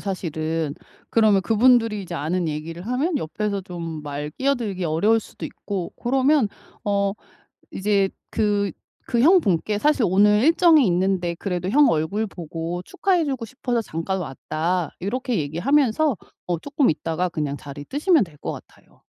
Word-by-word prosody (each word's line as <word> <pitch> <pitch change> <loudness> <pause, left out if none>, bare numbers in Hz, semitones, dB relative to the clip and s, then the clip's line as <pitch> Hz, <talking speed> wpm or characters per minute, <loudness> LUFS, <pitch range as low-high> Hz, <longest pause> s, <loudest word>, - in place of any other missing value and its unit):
사실은. 160 -5 -3 0.4
그러면 215 -3 +4
그분들이 225 -1 +3
이제 175 -2 -7
아는 170 +4 -1
얘기를 165 +4 -5
하면 280 +8 0
옆에서 200 +2 -2
좀 170 -3 -6
말 145 0 -5
끼어들기 225 - -1
어려울 175 +8 +3
수도 - - -10
있고 190 -4 -5
고러면 265 0 +2 0.4
어 200 -1 +1 0.6
이제 200 -1 +1 0.2
그 205 -3 +1 0.4
그 235 - +1
형분께 215 - +3
'사실 290 -2 +3
오늘 210 +3 +4
일정이 325 -3 +5
있는데 180 -1 +1
그래도 180 -1 -3
형 285 +5 +5
얼굴 165 +8 0
보고 170 -1 -5
축하해 360 - +1
주고 265 -4 -3
싶어서 245 0 -2
잠깐 190 0 -3
왔다.' 165 +3 -2
요렇게 245 +4 -1
얘기하면서 255 - +2 0.3
어 175 -2 -1
쪼끔 280 - +1
있다가 165 +3 -1
그냥 150 -4 -3
자리 145 0 -9
뜨시면 300 - +3
될 165 -6 -12
것 - - -4
같아요. - - -15
200 Hz, 320 characters per minute, -23 LUFS, 165-245 Hz, 0.6 s, 일정이